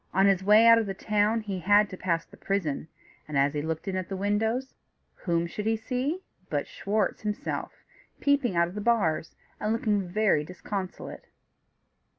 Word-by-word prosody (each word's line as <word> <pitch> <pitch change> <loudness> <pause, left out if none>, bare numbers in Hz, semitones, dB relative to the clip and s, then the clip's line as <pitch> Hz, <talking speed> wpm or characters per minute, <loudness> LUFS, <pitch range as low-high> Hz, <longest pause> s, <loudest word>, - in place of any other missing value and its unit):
On 195 +1 +5
his 195 -2 +3
way 210 +3 +6
out 230 0 +8
of 220 - -2
the 195 - -3
town 210 +2 +1
he 200 -3 -4
had 205 +3 +4
to - - -5
pass 170 -3 -1
the - - -17
prison, 165 -7 -2 0.4
and 150 -2 -2
as 140 +1 +3
he 150 - -1
looked 160 +4 -4
in 190 - -2
at 185 -2 -3
the 195 - -3
windows, 220 +6 0 0.4
whom 170 -2 -1
should 210 +5 -5
he 225 0 +2
see 260 +10 -2 0.3
but - - -1
Schwartz 215 - -1
himself 210 -1 -3 0.5
peeping 280 -8 +2
out 170 0 +3
of 175 - -9
the 210 - -4
bars, 195 -9 +1 0.2
and 210 - -1
looking 210 -4 0
very 205 -5 +2
disconsolate. 185 +3 -6
205 Hz, 180 wpm, -27 LUFS, 180-220 Hz, 0.5 s, out